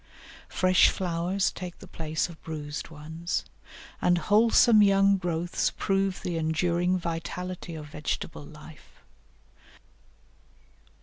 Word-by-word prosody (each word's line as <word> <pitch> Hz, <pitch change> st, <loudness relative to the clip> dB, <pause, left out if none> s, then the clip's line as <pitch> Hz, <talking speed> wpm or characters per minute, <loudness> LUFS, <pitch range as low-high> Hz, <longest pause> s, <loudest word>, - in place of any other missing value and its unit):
Fresh 185 Hz, -1 st, +4 dB
flowers 180 Hz, +1 st, -1 dB
take 180 Hz, -1 st, -8 dB
the -, -, -12 dB
place 155 Hz, -1 st, -2 dB
of 170 Hz, -3 st, -13 dB
bruised 150 Hz, -2 st, -6 dB
ones, 160 Hz, +2 st, -4 dB, 0.6 s
and 175 Hz, 0 st, +3 dB
wholesome 215 Hz, +4 st, +5 dB
young 195 Hz, 0 st, +5 dB
growths 175 Hz, -1 st, -1 dB
prove 195 Hz, -1 st, 0 dB
the 175 Hz, -2 st, -2 dB
enduring 170 Hz, +3 st, +1 dB
vitality 170 Hz, +1 st, -5 dB
of 155 Hz, -1 st, -7 dB
vegetable 150 Hz, 0 st, -4 dB
life. 150 Hz, +1 st, -15 dB
175 Hz, 105 wpm, -27 LUFS, 160-185 Hz, 0.6 s, wholesome